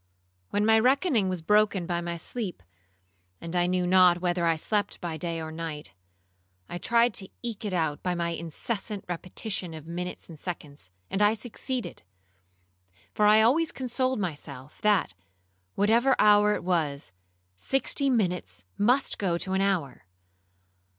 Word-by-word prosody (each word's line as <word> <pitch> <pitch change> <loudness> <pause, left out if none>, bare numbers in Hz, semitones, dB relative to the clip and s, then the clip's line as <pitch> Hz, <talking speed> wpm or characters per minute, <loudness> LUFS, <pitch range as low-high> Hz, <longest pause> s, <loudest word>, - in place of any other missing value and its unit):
When 205 +1 +1
my 220 0 +5
reckoning 255 - +2
was 180 -3 -3
broken 210 -1 +3
by 170 0 -2
my 170 0 -4
sleep, 185 - -4 0.8
(and 170 +1 -6
I 175 0 +2
knew 180 0 +1
not 180 -1 +5
whether 175 -1 0
I 165 - +3
slept 205 +5 -1
by 170 -3 -4
day 165 +1 -3
or 160 0 -6
by - - -9
night), 155 -7 -6 0.7
I 175 - -6
tried 235 +3 +3
to 190 -1 -3
eke 225 -3 -5
it 205 - -2
out 160 -4 -1
by 180 -1 -1
my 170 0 -1
incessant 195 +5 -3
repetition 180 0 -4
of 155 -1 -10
minutes 175 +2 -6
and 160 -3 -12
seconds, 145 - -7 0.2
and 195 - -1
I 210 +1 +4
succeeded; 245 +2 -4 1.1
for 210 - +3
I 215 +1 +6
always 300 +8 +3
consoled 255 -1 -1
myself, 145 -6 -6
that 210 - +2 0.6
whatever 230 +6 +3
hour 210 0 +5
it - - -5
was, 155 - -1 0.4
sixty 270 - 0
minutes 180 - -1 0.2
must 245 +6 +2
go 180 -4 0
to 190 +2 -4
an 190 - +1
hour. 175 - -1
185 Hz, 155 wpm, -27 LUFS, 170-215 Hz, 1.1 s, I